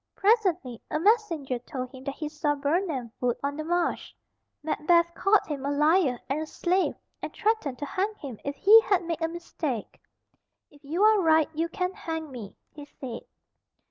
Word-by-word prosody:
Presently 370 - +1
a 305 - -1
messenger 335 - +1
told 255 +1 -6
him 260 -1 -11
that 275 -1 -3
he 305 - -4
saw 300 -1 -1
Birnam 285 - -1
Wood 245 -1 +1
on 285 0 -1
the 310 - -4
march. 345 +1 -1 0.5
Macbeth 340 +2 +2
called 390 +4 +3
him 285 -3 -5
a 280 - -1
liar 300 -2 +3
and 285 +3 -1
a 315 - -4
slave, 365 +4 0 0.3
and - - -5
threatened 425 - 0
to 290 - -4
hang 400 +8 -2
him 265 - -8
if 280 0 -3
he 430 +9 +8
had 390 -6 +1
made 335 -1 -3
a 325 - +2
mistake. 325 -8 -5 0.7
"If 290 0 -20
you 325 +8 -1
are 430 -1 +6
right 320 -2 +4
you 325 +2 -1
can 365 0 -2
hang 320 -4 -5
me," 225 -6 -8 0.2
he 295 -1 -10
said. 255 -4 -8
315 Hz, 180 wpm, -27 LUFS, 280-360 Hz, 0.7 s, he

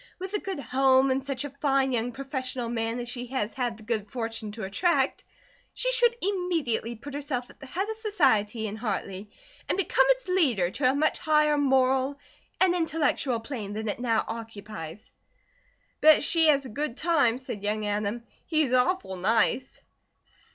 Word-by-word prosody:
With 375 +2 -7
a 415 - +1
good 385 -6 -5
home 265 0 +3
and 265 +1 0
such 275 0 -3
a - - -4
fine 275 -1 +1
young 240 0 -1
professional 260 -2 -4
man 230 0 -2
as 245 - -5
she 245 0 -5
has 235 -4 -2
had 245 -4 -2
the 220 - -14
good 215 -2 -2
fortune 225 -2 -4
to 220 -1 -6
attract, 335 - +1 0.5
she - - +2
should 480 -1 +5
immediately 335 - -1
put 280 +5 -10
herself 275 -4 -4
at - - -22
the 270 - -10
head 380 +9 -2
of 440 - -3
society 260 - +1
in 215 0 -4
Hartley 205 -3 -4 0.4
and - - +1
become 395 +5 +3
its - - +2
leader 260 - +2
to 255 +2 +2
a 265 - +1
much 305 +2 +1
higher 300 -1 +3
moral 265 -1 +2 0.4
and 375 -2 +4
intellectual 315 -7 0
plane 225 -5 -6
than 220 +1 -4
it 210 - -2
now 230 -3 +1
occupies." 215 -6 -8 0.9
"Bet 310 -1 +7
she 325 +1 +3
has 280 -3 +4
a - - -7
good 280 +2 -3
time," 290 -8 +2
said 245 -5 -7
young 210 +1 -1
Adam. 210 +3 -2 0.2
"He's 310 -6 +1
awful 250 - +1
nice." 225 +6 +1
260 Hz, 175 wpm, -27 LUFS, 225-300 Hz, 0.9 s, Bet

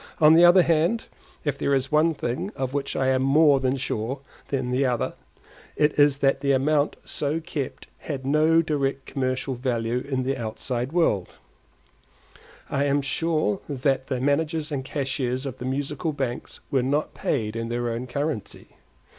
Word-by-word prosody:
On 155 -1 +7
the 170 +2 +7
other 175 +1 +8
hand, 170 +8 +2 0.4
if 145 -2 -1
there 140 - +2
is 135 +1 -1
one 155 +2 +3
thing 125 +9 -3
of 130 0 -3
which 140 -1 -2
I 130 0 +1
am 130 0 +2
more 140 +1 +5 0.2
sure 130 +1 -3 0.3
than 130 -3 -2
another, 125 -2 +1 0.6
it 150 0 +2
is 145 -1 +5
that 135 - +2
the 140 -1 +2
amount 145 +2 +2
so 150 +2 -1
kept 150 -4 -5
had 135 -4 -5
no 155 +4 +4
direct 140 -3 -1
commercial 130 -1 -2
value 120 -1 -1
in 130 -1 -2
the 135 +2 0
outside 120 +2 -3
world; 160 - +1 1.3
I 140 0 0
am 140 0 +1
sure 155 -7 0
that 135 -1 0
the 130 -2 -2
managers 150 +3 0
and 135 -2 -2
cashiers 130 -2 -2
of 130 -2 -6
the 125 - -5
Musical 145 +4 -2
Banks 130 -4 -4
were 135 - +3
not 145 +4 0
paid 110 -5 -2
in 115 0 -3
their 120 0 -1
own 120 +2 -4
currency. 140 -2 -4
135 Hz, 165 wpm, -25 LUFS, 130-150 Hz, 1.3 s, other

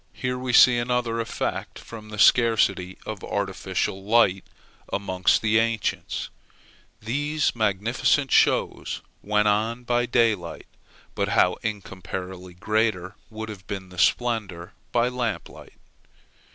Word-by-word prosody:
Here 125 0 -3
we 125 0 -3
see 120 0 +7
another 120 -1 -1
effect 115 - -3
from 110 -2 -11
the 105 - -8
scarcity 100 -6 +3
of 110 -3 -6
artificial 95 -1 -2
light 100 -3 +3 0.5
amongst 95 -1 +1
the 110 0 +3
ancients. 115 -1 -2 0.7
These 145 +7 -1
magnificent 115 +6 +1
shows - - +1 0.2
went 105 0 +1
on 110 +4 0
by 120 0 0
daylight. 115 -8 0 0.5
But - - -1
how - - +3
incomparably 95 -3 -6
greater 105 -1 -1
would 110 0 -7
have 95 -4 -10
been 95 -2 -6
the 90 -1 -9
splendor 105 -9 0 0.2
by 120 0 +2
lamp 125 -4 -3
light! - - -15
110 Hz, 120 wpm, -24 LUFS, 95-120 Hz, 0.7 s, see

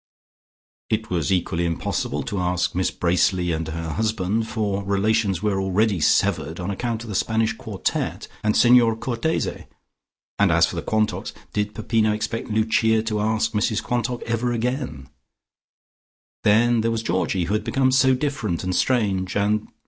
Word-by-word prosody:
It 110 -1 -2
was 85 -6 0
equally 85 -2 0
impossible 80 -4 -2
to 100 - -3
ask 90 0 0
Miss 90 +1 +1
Bracely 90 0 +1
and 80 0 -2
her 80 +1 -4
husband, 110 +3 -1
for 105 -3 -2
relations 100 -1 +1
were 100 -2 +1
already 95 +1 +1
severed 80 +1 +1
on 90 +2 -3
account 115 +2 -3
of 115 - -9
the - - -4
Spanish 110 +3 +1
quartette - - -3 0.2
and 105 0 +2
Signer 120 -2 +5
Cortese, 120 +7 -2 0.7
and - - +4
as - - +5
for - - -6
the - - -2
Quantocks, 110 0 -1 0.2
did 105 0 -2
Peppino 110 0 +1
expect 110 +2 -3
Lucia 110 0 +2
to 110 -2 -2
ask 110 +1 0
Mrs 105 0 0
Quantock 125 0 -2
again 120 - -2
ever? - - -18 1.4
Then 115 +2 +4
there 115 - +1
was 115 -1 -2
Georgie, 95 -1 0
who 90 +5 -2
had 105 -1 0
become 130 +3 +1
so 130 0 +4
different 125 - -2
and 90 0 -1
strange, 100 -7 +1
and 105 +1 +1
110 Hz, 155 wpm, -23 LUFS, 95-115 Hz, 1.4 s, Signer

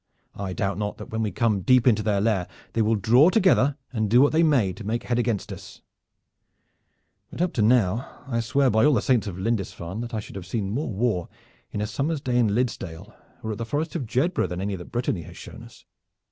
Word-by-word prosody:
I 95 -2 -5
doubt 100 -2 -2
not 105 -1 -3
that - - -10
when 110 0 -2
we 110 - 0
come 105 0 +1
deep 125 +4 +4
into 110 -4 +4
their 105 -1 +1
land 105 -5 +1 0.3
they 115 - +1
will 110 +1 +2
draw 120 - +5
together 185 - +3 0.2
and 110 -3 0
do 120 +4 +5
what 145 +2 +5
they 160 - +3
may 130 - +3
to 110 - -10
make 115 +3 -2
head 120 -1 0
against 115 -4 -1
us; - - -12 1.5
but - - -10
up 180 0 0
to 115 - 0
now 115 0 +2 0.2
I 115 -3 -2
swear 130 +3 +2
by 110 +1 +3
all 150 -1 +5
the - - +2
saints 120 -5 +2
of 95 -3 -5
Lindisfarne 95 -2 -3
that 120 -1 -5
I - - -1
should 100 - -9
have 90 -2 -8
seen 100 0 -2
more 140 +6 -2
war 100 -4 -1 0.4
in 105 - -3
a - - 0
summer's 140 +9 -2
day 125 -3 0
in 120 - +4
Liddesdale 105 -5 -3 0.3
or 110 - -3
at 110 - -5
the - - -2
Forest 150 +8 -3
of 140 -8 -3
Jedburgh 155 +11 0
than 90 - -4
any 100 +1 -2
that 90 -2 -8
Brittany 120 -7 -1
has - - -12
shown - - -10
us. - - -15
115 Hz, 230 wpm, -25 LUFS, 100-125 Hz, 1.5 s, draw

